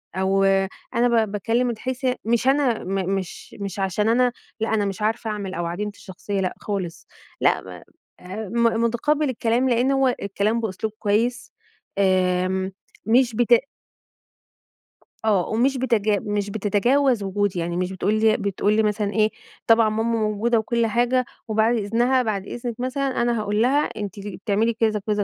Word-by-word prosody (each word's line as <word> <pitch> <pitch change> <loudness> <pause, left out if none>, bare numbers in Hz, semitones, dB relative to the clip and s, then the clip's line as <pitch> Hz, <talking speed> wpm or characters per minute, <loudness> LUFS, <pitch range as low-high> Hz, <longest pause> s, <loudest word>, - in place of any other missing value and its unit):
أو 190 +1 +2 0.5
أنا 235 -2 +3
ب 205 - -10
باكلّم 230 +4 0
من 235 - -2
حيث 260 +3 -4 0.2
مش 235 +2 +1
أنا 270 -4 +2
م 190 0 -2
مش 190 -2 -6
مش 200 -1 -5
عشان 195 +3 0
أنا 245 +2 +3 0.3
لأ، 220 0 -1
أنا 210 -2 +1
مش 195 +1 -4
عارفة 220 +1 -1
أعمل 200 -3 -4
أو 175 -2 -3
عديمة 205 +5 -3
الشخصية، 195 +1 -5
لأ 185 -1 -1
خالص. 190 -5 -5 0.3
لأ - - +3
ما - - -11 0.4
أ 195 +4 -6 0.3
م 230 - +1
مُتقبّل 290 +5 +1
الكلام 240 +1 +1
لإن 245 +3 +2
هو 270 -2 +2
الكلام 205 +3 0
بأسلوب 215 +1 -3
كويس 230 +4 0 0.5
آمم، 185 0 +1 0.4
مش 240 0 +3
بت 240 +1 +3 1.7
آه. 200 -5 +2
ومش 255 +5 +1
بتج 230 -5 +1
مش 205 0 0
بتتجاوز 220 +4 +2
وجودي. 195 -1 -1
يعني 170 +1 -2
مش 185 +1 -1
بتقول 190 +2 0
لي 220 0 +4
بتقول 200 +1 0
لي 220 - +3
مثلًا 210 -1 0
إيه، 215 0 +3 0.4
طبعًا 225 -1 +5
ماما 225 +1 0
موجودة 220 +2 +1
وكل 235 +1 0
حاجة 245 +3 +1 0.2
وبعد 220 +2 +2
إذنها، 235 +5 +2
بعد 200 -4 -2
إذنك 240 -1 -5
مثلًا 260 0 -1
أنا 240 -1 +1
هاقول 210 +1 0
لها 270 +4 +3
أنتِ 210 -3 -6
ل 200 -1 -7
بتعملي 215 +3 +1
كذا، 220 -1 +1
كذا 210 -1 +1
220 Hz, 165 wpm, -23 LUFS, 200-240 Hz, 1.7 s, طبعًا